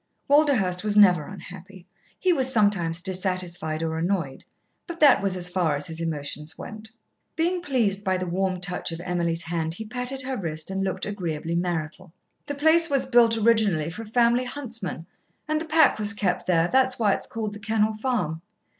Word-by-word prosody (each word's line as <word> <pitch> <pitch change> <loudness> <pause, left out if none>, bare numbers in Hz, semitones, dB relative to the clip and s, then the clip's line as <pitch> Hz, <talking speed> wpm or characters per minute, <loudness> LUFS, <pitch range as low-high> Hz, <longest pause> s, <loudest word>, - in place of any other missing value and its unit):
Walderhurst 260 -12 +3
was 210 -1 +1
never 180 -7 +6
unhappy. 185 0 -11 0.3
He 370 -1 +2
was 260 -4 +3
sometimes 195 -7 +1
dissatisfied 180 -4 -2
or 160 0 -2
annoyed, 170 -6 -2 0.4
but 340 -1 -7
that 290 -7 +6
was 195 -2 -1
as 180 -1 -2
far 175 -4 0
as 145 0 -4
his 160 0 -7
emotions 150 -1 -5
went. 215 +1 -9 0.5
Being 345 +2 0
pleased 225 - 0
by 190 -1 +1
the 185 - -3
warm 185 +1 -1
touch 180 -1 -3
of 165 - -6
Emily's 170 -1 -1
hand, 165 -1 -3
he 220 - -7
patted 250 +3 -3
her 260 0 -3
wrist 160 -2 -4
and 195 0 -2
looked 190 -1 -2
agreeably 170 -5 -4
marital. 170 0 -3 0.4
"The 285 - -4
place 320 +3 +4
was 275 -2 +1
built 235 -3 +4
originally 210 -8 +2
for 215 - -8
a 225 - -9
family 240 +2 +2
huntsman, 230 - -6 0.4
and 310 0 0
the - - -4
pack 315 -6 +4
was 210 +1 +1
kept 180 -3 -1
there. 170 -2 +3
That 260 +5 +3
is 260 - -3
why 210 -4 +2
it - - -1
is - - -5
called 215 -2 -4
The 210 - -9
Kennel 220 +1 0
Farm. 215 -9 -2
195 Hz, 190 wpm, -25 LUFS, 170-235 Hz, 0.5 s, never